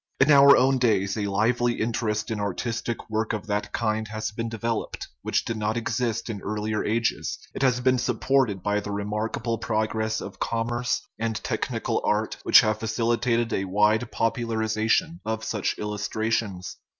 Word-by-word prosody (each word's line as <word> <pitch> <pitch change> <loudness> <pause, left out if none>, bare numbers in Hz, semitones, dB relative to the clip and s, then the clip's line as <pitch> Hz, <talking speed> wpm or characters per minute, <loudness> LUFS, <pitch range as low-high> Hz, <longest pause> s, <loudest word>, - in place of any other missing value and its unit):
In 140 +3 +5
our 140 0 +8
own 130 +1 +3
days 100 -5 +2
a 105 -2 -1
lively 120 +4 +2
interest 110 -1 -1
in 110 - -2
artistic 115 +4 -3
work 110 +1 -1
of 105 -2 -4
that 105 -1 -2
kind 110 -1 -1
has 110 0 -4
been 115 +2 -4
developed, 115 0 -3
which - - 0
did 115 - -3
not 110 +1 -1
exist 120 -1 -1
in 105 -4 -5
earlier 105 0 -2
ages; 115 +2 -1 0.2
it - - -5
has 125 -2 +3
been 130 0 +3
supported 125 -4 +1
by 105 0 +1
the 105 - -6
re 100 0 -2
markable 110 +2 -2
progress 110 0 -1
of - - -8
commerce 120 +2 -1
and 115 0 -1
technical - - -1
art 105 +1 0
which - - +7
have 110 -2 0
facilitated 115 +1 0
a 95 - 0
wide 105 +4 +2
popularization 115 - 0
of 110 0 -3
such 105 -3 -1
illustra 105 +1 -2
tions. 100 -5 -2
110 Hz, 165 wpm, -25 LUFS, 105-120 Hz, 0.2 s, our